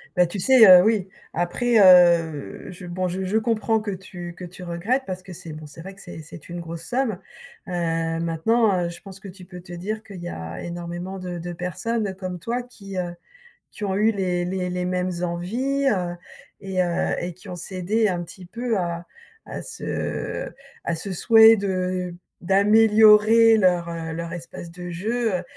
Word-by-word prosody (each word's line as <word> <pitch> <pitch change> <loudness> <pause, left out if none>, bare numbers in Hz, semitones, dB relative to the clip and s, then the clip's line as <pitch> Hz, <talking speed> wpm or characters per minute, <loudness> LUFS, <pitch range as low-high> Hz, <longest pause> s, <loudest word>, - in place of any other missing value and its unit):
Bah, 180 -1 +4
tu 195 +3 -5
sais, 245 0 +7
heu, 180 0 +10
oui, 205 -4 +1 0.2
après, 220 +7 +1
heu, 170 -6 +5
je 180 0 -10
bon 180 +1 -2
je 185 +2 -3
je 210 +4 +1
comprends 220 -1 +1
que 210 -1 -5
tu 180 -2 -7
que 180 - -7
tu 180 +1 -12
regrettes, 185 +10 -1
parce 185 -1 -5
que 185 -1 -10
c'est 160 -1 -9
bon 155 0 -9
c'est 150 +3 -12
vrai 195 +2 -9
que 200 - -15
c'est 170 -3 -9
c'est 155 +1 -13
une 175 0 -5
grosse 165 0 -7
somme, 250 -3 -1 0.5
heu, 165 -2 -1
maintenant, 180 +4 +1
heu, - - -2
je 175 - -10
pense 195 -1 -11
que 195 - -11
tu 185 0 -12
peux 180 0 -11
te 175 0 -11
dire 215 +5 -4
qu'il 195 -5 -10
y 175 - -5
a 80 +2 -7
énormément 175 +2 -6
de 180 -1 -6
de 175 +1 -5
personnes 195 +4 -3
comme 185 -1 -5
toi. 235 +8 -3
Qui, 200 -6 -11
heu, 175 -1 -4 0.6
qui 210 - -9
ont 190 -1 -1
eu 215 +2 +3
les 180 -3 -1
les 180 0 -2
les 180 0 -2
mêmes 180 0 -1
envies, 240 +12 -1
heu, 180 -5 -1 0.5
et 190 -2 -3
heu, 175 -1 0
et 175 0 -4
qui 185 +3 -14
ont 180 - -5
cédé 190 +5 -1
un 175 -2 -1
petit 180 +1 -12
peu 235 +2 -2
à 170 -1 -3 0.4
à - - -7
ce - - -4 0.4
à 170 - -1
ce 190 +4 -4
souhait 225 +4 +7
de 185 -2 -2 0.3
d'améliorer 215 +3 +6
leur, 180 -3 +2
heu, 165 -1 -5
leur 170 0 -5
espace 170 0 -8
de 180 0 -8
jeu. 220 +4 -1
Heu, 180 - -7
185 Hz, 195 wpm, -23 LUFS, 175-210 Hz, 0.6 s, heu